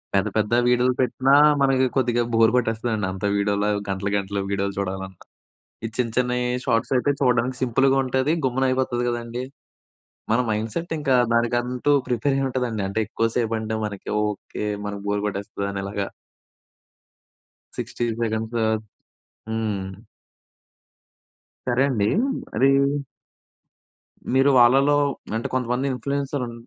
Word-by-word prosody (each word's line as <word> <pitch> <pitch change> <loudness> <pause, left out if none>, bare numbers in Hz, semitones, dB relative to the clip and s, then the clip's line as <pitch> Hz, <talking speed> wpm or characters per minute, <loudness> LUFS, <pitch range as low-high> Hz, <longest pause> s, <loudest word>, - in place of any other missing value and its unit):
పెద్ద 100 +2 +2
పెద్ద 105 +2 +1
వీడియోలు 125 +1 +3
పెట్టినా 130 +2 +2 0.3
మనకి 135 -1 +3
కొద్దిగా 120 -2 +2
బోర్ 115 -1 +5
కొట్టేస్తదండి. 115 -3 0
అంత 95 +2 -8
వీడియోల 100 0 +1 0.2
గంటలు 95 +1 -2
గంటలు 100 0 -3
వీడియోలు 100 0 -1
చూడాలన్న. 95 0 -3 0.8
ఈ - - -4
చిన్న 120 -2 0
చిన్నయి 125 0 +1 0.2
షార్ట్స్ 115 +3 0
అయితే 145 +3 +2
చూడడానికి 125 -1 +2
సింపుల్‌గా 135 +2 +3
ఉంటది, 130 +4 +1
గమ్మున 130 +1 0
అయిపోతది 130 -2 0
కదండీ. 120 +1 -3 0.9
మన 115 - +3
మైండ్‌సెట్ 110 +11 -3
ఇంకా 135 -3 +2 0.2
దానికంటూ 120 +3 +1 0.2
ప్రిపేర్ 130 +3 0
అయి 135 - +1
ఉంటదండి. 120 -5 -2
అంటే 100 +3 -2
ఎక్కువ 115 +1 0
సేపు 115 -2 0
అంటే 110 0 -3
మనకి 100 -2 -6
ఓకె. 105 0 -4 0.2
మన 105 - -3
బోర్ 100 0 0
కొట్టేస్తదనేలాగా. 100 0 -4 1.7
60 120 - -3 0.2
సెకండ్స్. 110 +1 -2 1.0
హ్మ్. 105 -4 -2 1.8
సరే 125 +2 +2
అండీ. 105 -5 +1 0.5
అదీ 130 +5 +4 1.7
మీరు 135 +2 +5
వాళ్ళలో 135 +4 +5 0.4
అంటే 115 - -2
కొంతమంది 125 +1 0
ఇన్ఫ్లుయెన్సర్ 140 0 -2
ఉం 120 - -7
120 Hz, 120 wpm, -23 LUFS, 105-130 Hz, 1.8 s, బోర్